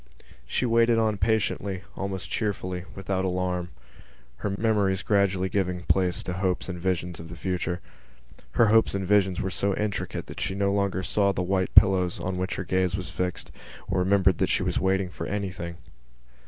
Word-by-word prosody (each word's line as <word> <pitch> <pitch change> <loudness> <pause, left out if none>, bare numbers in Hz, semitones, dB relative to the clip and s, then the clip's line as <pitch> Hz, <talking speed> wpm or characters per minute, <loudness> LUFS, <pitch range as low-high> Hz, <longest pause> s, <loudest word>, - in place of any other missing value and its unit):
She 125 - 0
waited 115 0 +4
on 110 -2 +1
patiently, 100 -2 0
almost 95 -1 -4
cheerfully, 95 -4 -2
without 95 -1 -2
alarm, 90 -1 -1 0.7
her 105 - -2
memories 100 -2 +1
gradually 100 -2 +2
giving 90 -2 -1
place 90 -2 +1
to 90 - -3
hopes 90 0 -1
and 90 -2 -5
visions 90 -1 -1
of 80 0 -9
the 85 - -8
future. 90 -1 -2 0.7
Her 115 - +4
hopes 110 -2 +4
and 95 -1 -2
visions 95 -3 +3
were 95 - -2
so 100 0 0
intricate 105 -1 -3
that - - -8
she 95 - -1
no 100 0 +1
longer 100 -2 0
saw 100 +1 +2
the 90 -2 -2
white 95 0 0
pillows 90 -2 +5
on 90 -1 -3
which 95 0 -2
her - - -3
gaze 95 0 0
was 90 - -6
fixed 90 -1 -3 0.4
or - - 0
remembered 95 -1 +3
that - - +2
she - - +1
was - - 0
waiting 95 0 +1
for - - -5
anything. 90 -4 -4
95 Hz, 180 wpm, -26 LUFS, 90-100 Hz, 0.7 s, pillows